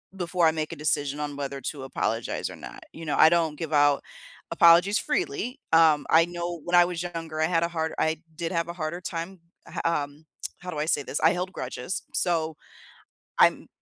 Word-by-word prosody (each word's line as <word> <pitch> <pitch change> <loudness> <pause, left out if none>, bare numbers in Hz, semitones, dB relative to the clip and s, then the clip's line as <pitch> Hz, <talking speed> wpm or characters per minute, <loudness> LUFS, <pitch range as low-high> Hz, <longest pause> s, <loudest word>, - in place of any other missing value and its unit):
before 175 -2 +1
I 160 - +4
make 155 -1 -3
a - - -7
decision 145 -1 -1
on 145 -1 -4
whether 140 -1 -4
to 135 +1 -5
apologize 115 -3 -2
or - - -9
not. - - -11
You 165 - -10
know, 150 - -1
I 155 - +8
don't 165 -2 +2
give 160 -1 -5
out 145 -1 +4 0.5
apologies 170 +5 +5
freely. 305 -5 -2
Um, 155 -3 +5
I 165 +1 +6
know 175 -1 -5
when 175 0 0
I 175 0 +7
was 175 -1 -4
younger, 165 -2 -5
I 160 - +3
had 165 -1 +1
a 170 - +2
hard 160 -2 -3
I 160 0 0 0.2
did 170 +1 -3
have 170 0 -1
a 170 - -4
harder 170 +1 -4
time 170 +1 -6 0.3
h - - -12
um, 150 -2 -2 0.3
how 180 0 -7
do 150 - -5
I 150 - 0
say 150 -3 +1
this? 140 - -3
I 160 +2 +5
held 180 +1 -3
grudges, 190 0 -5
so 160 -3 0 0.8
I'm - - +4
165 Hz, 210 wpm, -26 LUFS, 150-175 Hz, 0.8 s, I